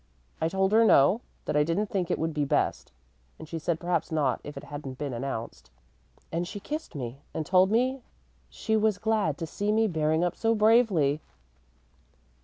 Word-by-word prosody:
"I 160 - +2
told 190 +2 +1
her 225 +1 +6
no, 205 - +5 0.2
that - - -2
I 150 - +4
didn't 170 +7 -1
think 185 -4 -1
it - - +1
would 160 0 -2
be 150 -1 0
best; 140 - 0 0.5
and 160 - -10
she 165 +1 -5
said 165 +1 -1
perhaps 175 -2 -1
not 145 -6 0
if 145 -1 -8
it - - -7
hadn't 140 -3 -7
been 140 -2 -4
announced, 120 -2 -5 0.6
and 170 +2 -2
she 205 - -6
kissed 305 - -6
me 130 0 -6
and 155 - -2
told 185 +3 +4
me 255 +4 +1 0.5
she 220 - -2
was 215 -2 +2
glad 210 -9 0
to 165 - -4
see 205 +6 -2
me 220 +1 +3
bearing 160 -2 +1
up 175 - 0
so 225 0 +1
bravely." 210 - +3
170 Hz, 190 wpm, -27 LUFS, 150-215 Hz, 0.6 s, her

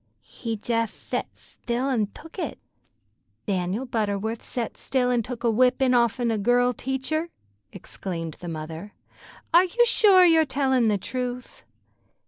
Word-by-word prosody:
"He 230 -2 -5
jeth 230 +1 -1
thet - - -5
thtill 250 +3 -3
an' 220 -5 +1
took 325 - -12
it." - - -3 0.9
"Dan'l 195 +4 -1
Butterwuth 220 -2 -2
set 240 -2 -4
still 250 -2 0
an' 240 -1 +2
took 240 +1 -7
a 235 - +3
whippin' 255 +2 +3
off'n 235 0 +2
a 220 - 0
girl 245 +4 +3
teacher!" 265 +7 -2 0.4
exclaimed 165 -4 -6
the 175 - -8
mother. 160 +5 -7 0.6
"Are 345 +2 +7
you 475 +7 +3
sure 395 -6 +6
you're 325 -2 +6
tellin' 265 -4 +1
the 210 -2 +2
truth?" 250 +4 -5
245 Hz, 140 wpm, -25 LUFS, 215-265 Hz, 0.9 s, Are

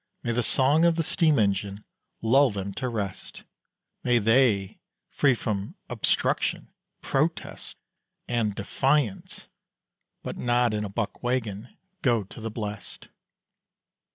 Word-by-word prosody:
May 120 - -1
the 120 +1 +1
song 140 +6 +3
of 170 -1 +4
the 165 - 0
steam 155 -1 +2
engine 100 -1 0 0.4
lull 135 +5 +5
them 100 -2 -4
to 130 +3 -3
rest; 100 -5 -5 0.6
May 125 -1 +3
they, 115 -3 +3 0.3
free 135 -3 +3
from 105 -3 -3 0.2
"obstruction," - - 0 0.3
"protest," 155 +5 -2 0.5
and 115 -4 0
"defiance" 130 +2 -1 0.8
(But - - -5
not 120 -1 +2
in 105 0 -1
a 105 - -4
buck 105 0 -3
waggon) 120 -3 -3 0.2
go 120 -5 +2
to 100 +4 -12
the 115 - -3
blest. 105 -1 -7
115 Hz, 125 wpm, -26 LUFS, 105-130 Hz, 0.8 s, lull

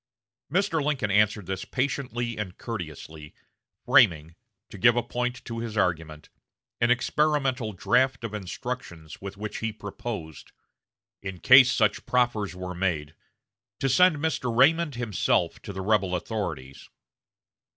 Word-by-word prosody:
Mr. 180 -4 +1
Lincoln 140 -8 -1
answered 105 0 +2
this 95 +1 -4
patiently 125 -3 -2
and 95 -5 -6
courteously, 80 - -8 0.5
framing, 80 0 +4 0.4
to 105 - -9
give 120 +5 +5
point 125 +1 -3
to 115 -1 -5
his 115 -2 -5
argument, 80 -5 -1 0.5
an 120 - +2
experimental 130 -2 +1
draft 125 +6 +1
of 115 -2 -5
instructions 95 - -6
with 100 0 -7
which 105 +1 -5
he 115 0 -2
proposed, 100 - -7 0.7
in 95 -2 -6
case 125 +3 +7
such 105 -3 +1
proffers 120 -6 +1
were 90 0 -6
made, 85 -5 -2 0.7
to 135 - 0
send 180 +6 +5
Mr. 145 -4 -1
Raymond 145 +5 +3
himself 120 -5 0
to - - -7
the 95 -1 -5
rebel 95 -2 +1
authorities. 85 - -5
110 Hz, 130 wpm, -26 LUFS, 90-125 Hz, 0.7 s, case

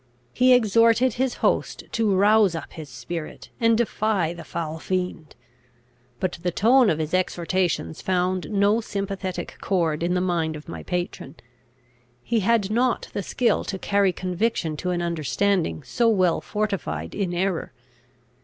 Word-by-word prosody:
He 255 +1 +4
exhorted 230 +1 +4
his 255 +1 -1
host - - 0
to 220 -4 +1
rouse 205 -1 +4
up 160 - -7
his 155 -3 -9
spirit, 155 +7 -7
and 230 -1 +4
defy 215 -7 0
the 170 -1 -9
foul 160 -1 -5
fiend; 180 -4 -3 0.8
but 185 -3 -2
the 180 - 0
tone 235 +6 +4
of 155 - +1
his 155 +1 -3
exhortations 180 - -1
found 185 0 0
no 205 +2 +2
sympathetic 195 -3 -4
chord 165 -5 0
in 175 +1 0
the - - +2
mind 170 -3 0
of 150 - -10
my 165 - -7
patron. 175 -5 -4 0.9
He 230 -1 +1
had 210 -1 +1
not 245 +2 +1
the - - -2
skill 240 +4 +1
to 190 - -4
carry 200 0 +2
conviction 180 -2 -1
to 180 - -3
an 175 -1 -1
understanding 170 +1 0
so 230 - +1
well 185 -6 +2
fortified 175 - -3
in 190 -3 -2
error. 180 0 -1
185 Hz, 150 wpm, -24 LUFS, 170-215 Hz, 0.9 s, He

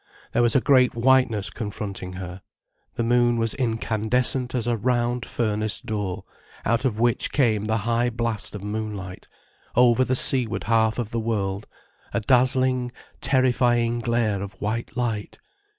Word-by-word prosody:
There 120 - +2
was 120 -1 +3
a 135 - +5
great 130 -4 +4
whiteness 120 -4 +3
confronting 100 -4 -6
her, 90 0 -7 0.5
the 115 - -1
moon 120 0 +3
was 115 -1 +2
incandescent 125 +2 0
as 120 -3 -1
a 120 -1 +1
round 120 0 -1
furnace 110 -2 0
door, 105 -4 -4 0.4
out 115 +3 +1
of 110 -4 -1
which 120 0 +1
came 110 -7 +1
the 110 +1 0
high 120 +1 +1
blast 115 -3 -3
of 100 - -7
moonlight, 105 -3 -5 0.5
over 125 +1 +5
the 130 0 0
seaward 125 -3 0
half 110 -1 +2
of 120 -3 -3
the 115 - -1
world, 100 -3 -2 0.5
a - - +2
dazzling, 130 +1 +2 0.3
terrifying 125 -3 +2
glare 115 -4 0
of 100 0 -6
white 115 +4 -3
light. 115 -4 -2
115 Hz, 150 wpm, -24 LUFS, 105-125 Hz, 0.5 s, a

